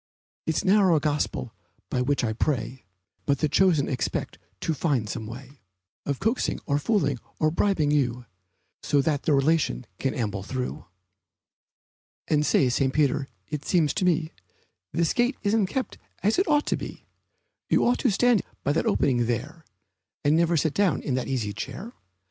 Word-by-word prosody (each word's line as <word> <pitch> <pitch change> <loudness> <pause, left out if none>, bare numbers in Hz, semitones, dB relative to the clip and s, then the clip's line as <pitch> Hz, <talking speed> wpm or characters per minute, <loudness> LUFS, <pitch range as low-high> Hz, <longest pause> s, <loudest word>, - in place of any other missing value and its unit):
It's 160 - 0
a - - -9
narrow 190 -4 +5
gospel 145 -5 -1 0.4
by 125 - +1
which 140 +1 +1
I 110 -2 0
pray, 130 0 -2 0.4
But 140 -1 +3
the 155 - +1
chosen 165 -2 +3
expect 130 -3 -3 0.2
to 165 - 0
find 140 -7 0
some 110 0 -5
way 130 +4 -10 0.5
Of 140 -2 -1
coaxing, 230 +3 0
or 140 0 +1
fooling, 145 - +1 0.2
or 155 0 +2
bribing 170 -4 +1
you 125 -4 0 0.6
So 145 - +2
that 145 -2 0
their 155 -4 +2
relation 140 - +1
can 135 - -1
amble 105 -5 -2
through. 125 -6 -4 1.4
And 150 -1 +2
say, 140 - +3
St. 130 +2 +1
Peter, 140 -1 +1 0.2
it 145 +5 -4
seems 160 -6 +2
to 205 - -1
me 165 -2 +1 0.6
This 165 +1 +1
gate 245 +2 +1
isn't 205 -1 +2
kept 260 +7 -3 0.2
as 210 - +3
it 380 - +2
ought 295 -1 +3
to - - +1
be; - - -8 0.6
You - - +3
ought 245 +1 +2
to 255 - +2
stand 230 0 +3 0.2
by 145 - +1
that 160 - 0
opening 120 -4 +2
there, 140 +8 -3 0.6
And 145 +2 +4
never 170 0 +3
sit 155 -1 +1
down 195 -9 +1
in 135 - -1
that 130 0 -1
easy 115 -6 -2
chair. 210 - -6
150 Hz, 170 wpm, -26 LUFS, 130-175 Hz, 1.4 s, narrow